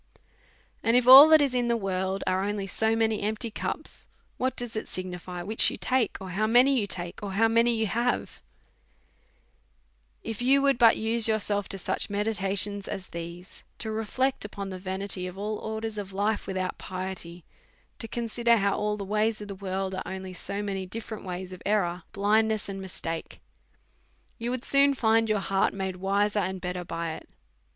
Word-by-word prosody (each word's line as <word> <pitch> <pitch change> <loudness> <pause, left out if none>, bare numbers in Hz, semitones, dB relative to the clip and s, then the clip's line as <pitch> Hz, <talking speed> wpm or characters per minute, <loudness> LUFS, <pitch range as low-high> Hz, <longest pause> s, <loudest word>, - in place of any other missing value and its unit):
And 230 +2 +3
if 250 -1 +2
all 275 +4 +12
that 315 -2 +7
is 275 -3 0
in 245 -1 +1
the 235 0 +2
world 190 -1 -2
are 185 +1 +1
only 205 0 -2
so 220 +3 +1
many 225 -1 +1
empty 220 +2 -2
cups, - - -4 0.3
what 255 0 -1
does 245 -2 -3
it 215 - -3
signify 180 -1 -6
which 220 +4 +3
you - - -6
take, 255 -4 0
or 190 -1 -7
how 210 +4 0
many 255 +4 +5
you 205 - -1
take, 175 -2 -5
or 200 -2 -5
how 225 +3 +4
many 230 +1 +3
you 220 0 0
have? 235 +5 -1 1.8
If 225 0 -5
you 270 +3 +4
would 275 -3 +3
but 230 -2 +6
use 225 +1 +2
yourself 205 -2 0
to 195 - -2
such 190 - -2
meditations 205 -1 -1
as 190 - -6
these, 170 +2 -8 0.2
to 220 - -4
reflect 255 +5 -1
upon 200 -1 -6
the 185 - -6
vanity 190 0 -3
of 180 +1 -9
all 210 +1 -3
orders 220 0 -4
of 195 -1 -6
life 205 +2 -1
without 185 -1 -3
piety, 185 -2 -6 0.5
to 225 - -5
consider 235 +1 +1
how 200 -1 +1
all 210 0 -1
the 200 - -5
ways 215 +2 0
of 205 -1 -8
the - - -4
world 190 0 -3
are 190 -1 -6
so 200 +3 -4
many 195 -2 -3
different 220 +1 -7
ways 185 0 -5
of 185 - -10
error, 185 -4 0
blindness, 215 +1 +1
and 195 -1 -5
mistake, 165 -3 -6 1.0
you 235 +1 -3
would 255 0 -3
soon 280 0 +4
find 225 -2 +2
your 215 - +2
heart 195 0 +1
made 190 -1 -3
wiser 200 +2 +1
and 190 -1 -2
better 180 0 -4
by 165 -1 -4
it. - - -11
205 Hz, 185 wpm, -27 LUFS, 190-225 Hz, 1.8 s, all